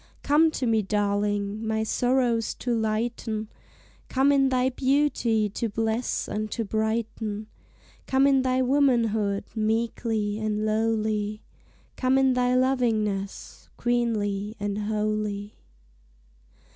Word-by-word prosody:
Come 310 Hz, +3 st, +4 dB
to 255 Hz, -, -1 dB
me, 225 Hz, -2 st, +2 dB
darling, 205 Hz, +1 st, -1 dB
my 220 Hz, 0 st, 0 dB
sorrows 245 Hz, 0 st, +1 dB
to 245 Hz, -, -2 dB
lighten, 220 Hz, -1 st, -2 dB, 0.6 s
Come 270 Hz, +2 st, +3 dB
in 275 Hz, -1 st, +4 dB
thy 255 Hz, 0 st, +2 dB
beauty 260 Hz, -5 st, +1 dB
to 225 Hz, +3 st, -3 dB
bless 225 Hz, +3 st, -1 dB
and 215 Hz, 0 st, -3 dB
to 230 Hz, -, -2 dB
brighten; 220 Hz, 0 st, -2 dB, 0.6 s
Come 265 Hz, +1 st, +3 dB
in 275 Hz, -1 st, +4 dB
thy 260 Hz, 0 st, +1 dB
womanhood, 230 Hz, -7 st, +2 dB
meekly 220 Hz, -1 st, -1 dB
and 215 Hz, -1 st, -1 dB
lowly, 215 Hz, -1 st, 0 dB, 0.5 s
Come 255 Hz, 0 st, +2 dB
in 265 Hz, -1 st, +4 dB
thy 250 Hz, 0 st, +2 dB
lovingness, 220 Hz, -7 st, -1 dB
queenly 215 Hz, -4 st, -1 dB
and 205 Hz, 0 st, -2 dB
holy. 210 Hz, -1 st, -2 dB
220 Hz, 110 wpm, -26 LUFS, 210-250 Hz, 0.6 s, Come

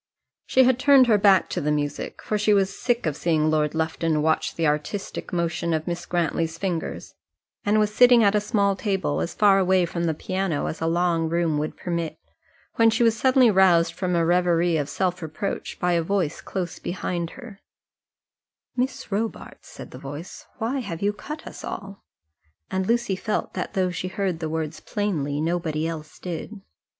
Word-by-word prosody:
She 260 Hz, -, +5 dB
had 255 Hz, 0 st, +3 dB
turned 270 Hz, -1 st, +6 dB
her 220 Hz, -4 st, +4 dB
back 195 Hz, -2 st, +5 dB
to -, -, -2 dB
the 150 Hz, -, -1 dB
music, 145 Hz, -1 st, -3 dB
for 215 Hz, -, -2 dB
she 210 Hz, 0 st, +3 dB
was 195 Hz, -1 st, +1 dB
sick 245 Hz, -4 st, 0 dB
of 155 Hz, -3 st, 0 dB
seeing 155 Hz, -2 st, +1 dB
Lord 150 Hz, 0 st, +1 dB
Lufton 160 Hz, -1 st, 0 dB
watch 160 Hz, 0 st, +1 dB
the 165 Hz, -, 0 dB
artistic 150 Hz, +7 st, -2 dB
motion 170 Hz, -1 st, -1 dB
of 155 Hz, 0 st, -3 dB
Miss 175 Hz, 0 st, -4 dB
Grantly's 165 Hz, -1 st, -1 dB
fingers, 175 Hz, -3 st, -4 dB, 0.5 s
and 205 Hz, +1 st, +2 dB
was 210 Hz, -1 st, +2 dB
sitting 245 Hz, 0 st, +6 dB
at 200 Hz, -1 st, +4 dB
a 210 Hz, -, +2 dB
small 200 Hz, -1 st, +1 dB
table 190 Hz, -, -1 dB
as 80 Hz, -, -4 dB
far 200 Hz, -2 st, +5 dB
away 185 Hz, -1 st, +3 dB
from 170 Hz, 0 st, -3 dB
the 160 Hz, -2 st, 0 dB
piano 185 Hz, -2 st, -2 dB
as 160 Hz, -, -4 dB
a 165 Hz, -, 0 dB
long 165 Hz, -1 st, +1 dB
room 165 Hz, -2 st, +1 dB
would 155 Hz, +1 st, -4 dB
permit, 170 Hz, -2 st, -3 dB, 0.6 s
when 230 Hz, 0 st, +6 dB
she 225 Hz, +2 st, +1 dB
was 230 Hz, -1 st, +4 dB
suddenly 255 Hz, 0 st, +4 dB
roused 185 Hz, -4 st, +4 dB
from 185 Hz, -2 st, -1 dB
a 170 Hz, -1 st, +2 dB
reverie 175 Hz, -1 st, +2 dB
of 145 Hz, -2 st, -1 dB
self 185 Hz, +1 st, -1 dB
reproach 160 Hz, +5 st, -4 dB
by 180 Hz, -1 st, +1 dB
a 170 Hz, -, +2 dB
voice 170 Hz, -2 st, -1 dB
close 180 Hz, -3 st, -4 dB
behind 175 Hz, -1 st, -3 dB
her: 235 Hz, -6 st, -11 dB, 1.2 s
"Miss 255 Hz, -3 st, -2 dB
Robarts," 215 Hz, +3 st, -4 dB
said -, -, -10 dB
the -, -, -10 dB
voice, 145 Hz, +5 st, -8 dB
"why 240 Hz, +5 st, -1 dB
have 195 Hz, -7 st, -5 dB
you 205 Hz, +1 st, +2 dB
cut 300 Hz, +9 st, -8 dB
us -, -, -9 dB
all?" 195 Hz, 0 st, -7 dB, 0.7 s
and 190 Hz, 0 st, -1 dB
Lucy 235 Hz, -4 st, +1 dB
felt 210 Hz, +3 st, -3 dB
that -, -, -4 dB
though 185 Hz, -2 st, +1 dB
she 180 Hz, +1 st, -4 dB
heard 190 Hz, -3 st, -2 dB
the 160 Hz, -1 st, -3 dB
words 160 Hz, 0 st, -3 dB
plainly, 155 Hz, -9 st, -2 dB
nobody 160 Hz, -1 st, -1 dB
else 155 Hz, -2 st, -7 dB
did. 180 Hz, +4 st, -6 dB
180 Hz, 185 wpm, -24 LUFS, 160-205 Hz, 1.2 s, turned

